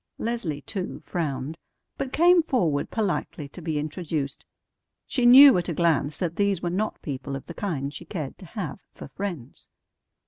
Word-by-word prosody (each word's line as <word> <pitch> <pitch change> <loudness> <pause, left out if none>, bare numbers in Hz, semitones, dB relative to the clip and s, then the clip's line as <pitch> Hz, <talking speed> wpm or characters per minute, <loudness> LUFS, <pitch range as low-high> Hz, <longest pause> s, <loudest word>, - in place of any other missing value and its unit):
Leslie, 205 -11 -3
too, 190 -3 -4
frowned, 150 -2 -3 0.4
but 265 - -4
came 345 +3 +6
forward 175 - 0
politely 190 -8 -2
to 175 - -11
be 160 -2 -2
introduced. 150 -2 -3 0.6
She 250 -3 +2
knew 265 -3 +10
at 175 - -4
a 170 - -2
glance 155 -3 +1
that 170 -3 -3
these 200 -3 +2
were 175 0 -2
not 210 +4 -2
people 135 -1 -4
of 135 - -7
the 170 - -8
kind 145 -8 -3
she 170 - -8
cared 155 -6 -6
to 185 - -11
have 195 +2 -5
for - - -10
friends. 180 -11 -6
170 Hz, 170 wpm, -26 LUFS, 150-205 Hz, 0.6 s, knew